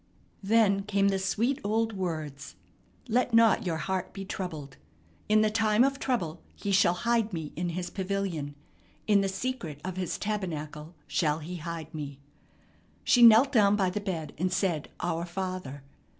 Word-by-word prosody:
Then 200 Hz, -1 st, +3 dB
came 200 Hz, 0 st, +1 dB
the 195 Hz, -1 st, 0 dB
sweet 225 Hz, +8 st, 0 dB
old 225 Hz, +2 st, 0 dB
words, 155 Hz, -7 st, -5 dB, 0.5 s
"Let 245 Hz, 0 st, +1 dB
not 225 Hz, -4 st, +5 dB
your 165 Hz, -2 st, 0 dB
heart 190 Hz, +1 st, -3 dB
be 195 Hz, -1 st, -6 dB
troubled." 155 Hz, -8 st, -6 dB, 0.5 s
"In 215 Hz, 0 st, +5 dB
the 215 Hz, 0 st, +2 dB
time 220 Hz, +1 st, +3 dB
of 275 Hz, +1 st, +1 dB
trouble 175 Hz, -11 st, -2 dB
he 200 Hz, -, -3 dB
shall 185 Hz, -2 st, +4 dB
hide 230 Hz, -2 st, +2 dB
me 160 Hz, -4 st, -5 dB
in 175 Hz, +2 st, -2 dB
his 175 Hz, +1 st, -4 dB
pavilion; 185 Hz, -7 st, -3 dB, 0.5 s
in 205 Hz, -2 st, +4 dB
the 195 Hz, -, 0 dB
secret 195 Hz, -, -4 dB
of 185 Hz, -1 st, -4 dB
his 185 Hz, -2 st, -2 dB
tabernacle 165 Hz, -6 st, -4 dB
shall 150 Hz, -2 st, +1 dB
he 165 Hz, +3 st, -6 dB
hide 165 Hz, -1 st, -6 dB
me." 145 Hz, -3 st, -6 dB, 0.9 s
She 245 Hz, -, +4 dB
knelt 235 Hz, +4 st, +8 dB
down 205 Hz, -5 st, +4 dB
by 190 Hz, -3 st, +1 dB
the 210 Hz, -, -3 dB
bed 170 Hz, -6 st, -4 dB
and 185 Hz, +1 st, 0 dB
said 180 Hz, -5 st, -1 dB
"Our 165 Hz, +1 st, -1 dB
Father." 180 Hz, -6 st, -5 dB
190 Hz, 165 wpm, -28 LUFS, 165-215 Hz, 0.9 s, knelt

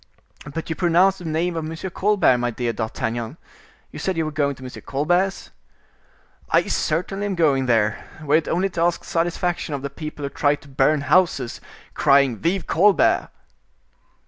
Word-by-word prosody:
"But 165 Hz, +2 st, -5 dB
you 160 Hz, -, -3 dB
pronounced 185 Hz, +2 st, +3 dB
the 175 Hz, -, -9 dB
name 165 Hz, +2 st, -1 dB
of 165 Hz, -, -2 dB
M. 165 Hz, +4 st, -5 dB
Colbert, 195 Hz, -10 st, +3 dB
my 120 Hz, 0 st, 0 dB
dear 120 Hz, 0 st, -3 dB
M. -, -, -11 dB
d'Artagnan; 115 Hz, +3 st, -3 dB, 0.5 s
you -, -, -8 dB
said 190 Hz, -3 st, -2 dB
you 160 Hz, -, 0 dB
were 155 Hz, -, -3 dB
going 145 Hz, -2 st, 0 dB
to 130 Hz, -, -13 dB
M. 130 Hz, -, -6 dB
Colbert's?" 175 Hz, +8 st, -1 dB, 1.0 s
"I -, -, +3 dB
certainly 190 Hz, +5 st, -1 dB
am 195 Hz, -, -2 dB
going 140 Hz, -6 st, +2 dB
there, 110 Hz, -2 st, +1 dB, 0.2 s
were 150 Hz, +1 st, +3 dB
it 160 Hz, -, -2 dB
only 185 Hz, +3 st, 0 dB
to 175 Hz, -2 st, -4 dB
ask 170 Hz, 0 st, +1 dB
satisfaction 175 Hz, -1 st, -1 dB
of 140 Hz, -, -6 dB
the 140 Hz, -, -4 dB
people 155 Hz, 0 st, -7 dB
who 140 Hz, -, -2 dB
try 145 Hz, +1 st, +1 dB
to 145 Hz, -, -18 dB
burn 140 Hz, +2 st, +2 dB
houses, 140 Hz, -6 st, +1 dB, 0.3 s
crying 140 Hz, -4 st, +3 dB
'Vive 175 Hz, +3 st, 0 dB
Colbert! 195 Hz, +4 st, +3 dB
155 Hz, 175 wpm, -22 LUFS, 140-175 Hz, 1.0 s, pronounced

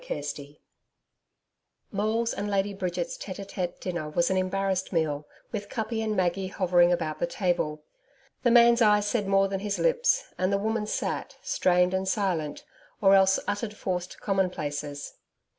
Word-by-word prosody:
CHAPTER -, -, -4 dB
4 -, -, -20 dB, 1.4 s
Maule's 220 Hz, +3 st, 0 dB
and 205 Hz, +1 st, -3 dB
Lady 200 Hz, 0 st, 0 dB
Bridget's 180 Hz, -3 st, -3 dB
TETE 195 Hz, 0 st, -7 dB
TETE 180 Hz, -3 st, -4 dB
dinner 170 Hz, -4 st, -4 dB
was 170 Hz, +4 st, +1 dB
an 190 Hz, -, +2 dB
embarrassed 190 Hz, 0 st, -1 dB
meal, 150 Hz, -4 st, -1 dB, 0.2 s
with 205 Hz, -2 st, -5 dB
Kuppi 225 Hz, 0 st, -2 dB
and 215 Hz, -1 st, -1 dB
Maggie 185 Hz, +1 st, +1 dB
hovering 180 Hz, -2 st, +3 dB
about 160 Hz, -3 st, -1 dB
the 175 Hz, -, 0 dB
table. 170 Hz, -5 st, -1 dB, 0.6 s
The 245 Hz, -, +3 dB
man's 235 Hz, 0 st, +6 dB
eyes 210 Hz, -2 st, +5 dB
said 210 Hz, -1 st, 0 dB
more 195 Hz, 0 st, +4 dB
than 195 Hz, 0 st, -3 dB
his 205 Hz, 0 st, -2 dB
lips, -, -, +2 dB, 0.2 s
and 185 Hz, +1 st, +1 dB
the 200 Hz, -, +3 dB
woman 215 Hz, +1 st, -1 dB
sat, -, -, -3 dB
strained 180 Hz, -, +2 dB
and 190 Hz, 0 st, -1 dB
silent, 185 Hz, -7 st, -1 dB, 0.3 s
or 195 Hz, -2 st, +5 dB
else 190 Hz, 0 st, +5 dB
uttered 205 Hz, +1 st, -2 dB
forced 180 Hz, -3 st, -4 dB
commonplaces. 150 Hz, -7 st, -2 dB
195 Hz, 160 wpm, -27 LUFS, 175-210 Hz, 1.4 s, man's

